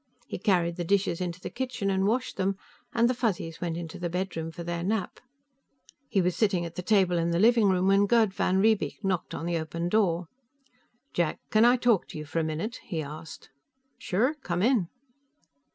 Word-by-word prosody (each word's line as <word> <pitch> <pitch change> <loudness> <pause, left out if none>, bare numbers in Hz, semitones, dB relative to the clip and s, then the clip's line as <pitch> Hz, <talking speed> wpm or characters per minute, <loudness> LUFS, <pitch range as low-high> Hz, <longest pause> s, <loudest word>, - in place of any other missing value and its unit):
He - - -6
carried 175 -4 +1
the 175 - -2
dishes 190 -1 +1
into 175 -1 -3
the - - -7
kitchen 250 -6 -2
and 190 0 +1
washed 250 +4 0
them, 195 0 0 0.3
and 235 0 +3
the 250 - +2
Fuzzies 195 -9 -2
went 170 -2 -2
into 170 -1 -7
the 175 -1 -2
bedroom 170 -2 -3
for 165 +1 -8
their 170 0 -3
nap. 200 +1 -2 0.9
He 195 - +2
was 180 0 +1
sitting 195 -6 +1
at 170 - -7
the 180 - -5
table 185 -3 +3
in 165 0 0
the 170 - +1
living 225 +1 +5
room 185 0 +2
when 195 +1 +4
Gerd 220 -3 +3
van 190 -1 +1
Riebeek 215 +1 +1
knocked 190 -3 -1
on 165 - -5
the 170 -1 0
open 170 +2 -3
door. 180 -5 +1 0.9
"Jack, 170 -3 0
can 220 +1 +5
I 245 +1 +6
talk 240 -5 +2
to - - -8
you 150 - -6
for 150 +3 -2
a - - +1
minute?" 160 +10 -3
he 165 -5 -3
asked. 155 +1 -10 0.5
"Sure. 235 +11 +1
Come 180 - -3
in." 230 -7 +3
185 Hz, 200 wpm, -28 LUFS, 170-215 Hz, 0.9 s, I